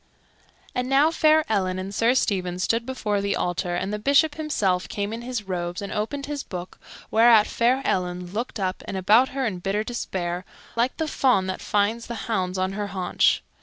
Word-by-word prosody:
And 250 0 -2
now 280 +4 +4
fair 310 -1 +4
Ellen 185 -4 0
and 190 +1 -5
Sir 230 +5 +3
Stephen 185 -7 0
stood 230 +6 0
before 210 -6 -1
the 200 0 0
altar, 175 0 -1
and 195 +3 -2
the 210 - -2
Bishop 285 +6 +3
himself 210 -13 -1
came 205 +1 -3
in 230 - -5
his 240 -2 -4
robes 175 -2 -3
and 200 - -5
opened 275 +7 -3
his 290 -1 -4
book, 180 -5 -8 0.3
whereat 225 -1 +6
fair 250 +3 +1
Ellen 180 -1 -1
looked 230 +1 -3
up 185 -1 -2
and 195 - -3
about 215 +7 +4
her 265 0 -2
in 195 -6 -2
bitter 195 +4 -1
despair, 180 -6 -3 0.3
like 240 +3 0
the 320 - -1
fawn 250 -10 +2
that 185 0 -4
finds 210 +3 0
the 235 - -5
hounds 190 -4 -1
on 185 0 0
her 205 +1 -3
haunch. 185 -3 +1
210 Hz, 195 wpm, -24 LUFS, 185-250 Hz, 0.3 s, whereat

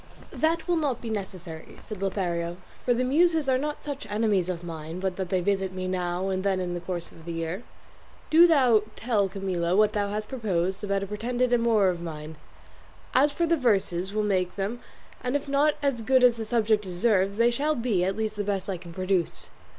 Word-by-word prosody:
"That 325 +2 0
will 350 -1 +2
not 285 -6 0
be 230 - -5
necessary," 185 -6 -6
said 210 -3 -8
Lothario, 175 -3 -1 0.3
"for - - +1
the 245 +1 +2
muses 320 +3 +3
are 260 -1 +3
not 295 +2 -4
such 285 -2 -5
enemies 205 -4 +1
of 175 -1 -3
mine 165 0 -6
but 190 -1 -2
that 190 -2 -4
they 185 -1 +1
visit 190 0 0
me 185 0 -3
now 180 0 -1
and 190 0 -1
then 195 -2 +1
in 180 -1 -2
the 175 - -3
course 175 -1 -4
of 165 - -15
the 170 - -6
year. 165 +4 -3 0.7
Do 335 +2 +8
thou 255 -9 +5
tell 215 -4 +1
Camilla 185 -3 -1
what 210 +1 +4
thou 205 -1 0
hast 210 +1 -3
proposed 195 -6 -1
about 200 -1 0
a - - -2
pretended 240 +5 -1
amour 230 -5 +4
of 175 -2 -3
mine; 155 -2 -7 0.8
as 285 +3 +4
for 340 +4 0
the 335 0 +2
verses 195 - +1
will 215 +1 0
make 185 -3 0
them, 205 +5 -3 0.4
and 250 +2 -1
if 285 0 -1
not 285 +2 +3
as 275 -5 +1
good 255 +3 +3
as 245 -2 +6
the 225 -1 -5
subject 215 -1 +2
deserves, 195 +1 +1
they 235 +1 +4
shall 295 +5 0
be 230 -8 +1
at 190 +2 -1
least 215 -1 -2
the 205 - -2
best 195 -1 -2
I 185 - -3
can 170 -1 -11
produce." 185 -1 -1
200 Hz, 210 wpm, -27 LUFS, 185-245 Hz, 0.8 s, Do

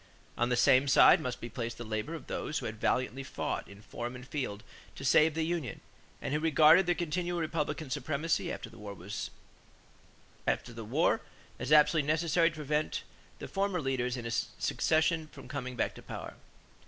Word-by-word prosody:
On 120 +1 +1
the 125 - +2
same 130 +3 +5
side 135 - +7
must 125 -1 -3
be 120 - -6
placed 115 0 -5
the 120 - -6
labor 110 +7 -3
of 160 - -9
those 150 - -3
who - - -4
had 110 0 -6
valiantly 130 +1 0
fought 135 - -3
in 100 +1 -14
forum 120 +3 -5
and 125 +1 -10
field 125 -8 -4 0.3
to 135 - -7
save 155 +3 +5
the 160 - 0
union 165 -8 -3 0.4
and - - -2
who 150 - +2
regarded 160 +3 +6
continued 175 +1 -1
Republican 155 -3 -2
supremacy 155 +4 -1
after - - -5
the 115 0 -14
war 105 -1 -7
as 95 +5 -5 2.4
absolutely 150 0 +5
necessary 165 +2 +3
to 160 - -12
prevent 150 0 -1 0.3
the - - -7
former 195 -2 0
leaders 130 -3 -1
in 120 -1 -5
secession 160 +6 +1
from - - -13
coming 130 -3 -5
back - - 0
to - - -12
power. - - -7
145 Hz, 165 wpm, -31 LUFS, 125-160 Hz, 2.4 s, side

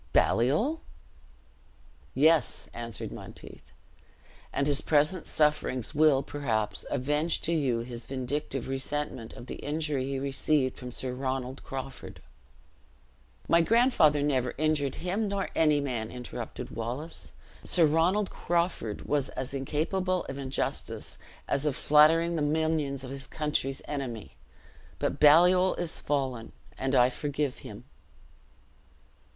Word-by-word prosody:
"Baliol?" 160 - +2 1.3
"Yes," 160 +3 +3
answered 115 -2 -5
Monteith; - - -11 0.8
"and 140 - 0
his 145 -1 +2
present 155 +4 +2
sufferings 150 -4 +1
will, 150 -3 +4
perhaps, 110 -9 -2
avenge 150 +5 0
to 170 - -1
you 130 -7 +1
his 120 -1 -6
vindictive 135 0 -3
resentment 135 -3 -2
of - - -10
the - - -7
injury 145 -3 -2
he 135 0 -2
received 135 0 0
from 125 -1 -8
Sir 130 +1 -4
Ronald 130 0 -3
Crawford." 135 0 -7 1.3
"My 170 - +5
grandfather 165 - +4
never 130 -4 0
injured 150 -2 +1
him, 195 +5 -1
nor 200 -1 -2
any 150 -2 +4
man!" 120 -6 -3
interrupted 125 0 -7
Wallace: 125 +8 -5 0.3
"Sir 170 -3 +3
Ronald 175 +7 +2
Crawford 170 - -1
was 145 -2 0
as 130 +1 -4
incapable 175 +7 -1
of 135 +1 -6
injustice 135 -1 -3 0.3
as 140 +2 0
of 140 - 0
flattering 165 +3 +5
the 160 - -1
minions 150 -2 0
of 130 - -7
his 135 -1 -5
country's 150 -3 -1
enemy. 130 -7 -5 0.6
But - - -2
Baliol 180 +5 +6
is 175 -2 -2
fallen, 130 -5 -2 0.2
and 135 +1 -1
I 125 0 +5
forgive 145 0 -2
him." - - -10
145 Hz, 125 wpm, -29 LUFS, 130-160 Hz, 1.3 s, Baliol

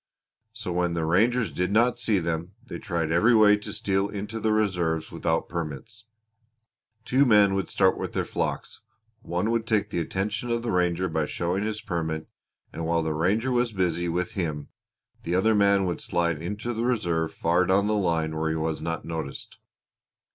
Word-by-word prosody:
So 105 -5 -5
when 90 -1 0
the 80 -1 -1
rangers 115 +8 +2
did 90 +2 -1
not 120 +3 +3
see 110 -4 +1
them 85 +1 -2
they - - -7
tried 85 -3 -2
every 110 +9 +4
way 105 -1 +7
to 105 - -8
steal 95 0 0
into 105 +2 -5
the 110 0 +1
reserves 90 -7 0
without 80 0 -1
permits. 85 +7 -6 1.0
Two 130 +4 +3
men 105 -6 +5
would 95 -1 -1
start 95 -1 +2
with - - -4
their - - -1
flocks; - - -3 0.4
one 90 +5 -1
would 115 -1 -1
take 110 -3 +1
the - - -1
attention 105 +7 -2
of 115 0 -1
the 120 - -1
ranger 90 0 +1
by 80 -3 -1
showing 90 +3 -2
his 110 0 -3
permit 80 -5 -3 0.5
and 85 - -5
while 85 0 +1
the 80 -1 -1
ranger 100 +11 +1
was 120 -1 +1
busy 85 -2 0
with 90 +1 -1
him 80 -6 -3 0.5
the 85 - -2
other 110 +5 +3
man 100 -2 +3
would 90 -2 -2
slide 85 -3 -1
into 105 +7 -4
the 115 +1 -2
reserve 85 -10 0
far 85 +2 +1
down 100 +2 +3
the 105 - +1
line 85 -6 0
where 80 0 -1
he 80 - -1
was 80 0 -2
not 85 -1 -3
noticed." 80 -4 -6
95 Hz, 185 wpm, -26 LUFS, 85-110 Hz, 1.0 s, way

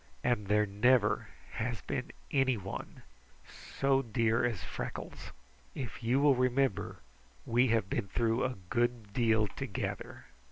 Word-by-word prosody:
And 120 -5 +1
there 105 +1 +3
never 105 +2 +3 0.2
has 115 -4 -3
been - - -3 0.2
anyone 130 -8 -1 0.7
so 135 -1 +3
dear 115 -1 +1
as 115 -6 -1
Freckles. - - -6 0.4
If 130 -4 -5
you 120 +4 +2
will 145 0 +6
remember, 130 -3 +1 0.5
we 120 +2 +3
have 115 -4 +2
been 100 - -2
through 115 +3 +1
a 130 -1 -1 0.2
good 120 -3 0
deal 110 -2 +3
together. - - -5
120 Hz, 125 wpm, -32 LUFS, 105-125 Hz, 0.7 s, will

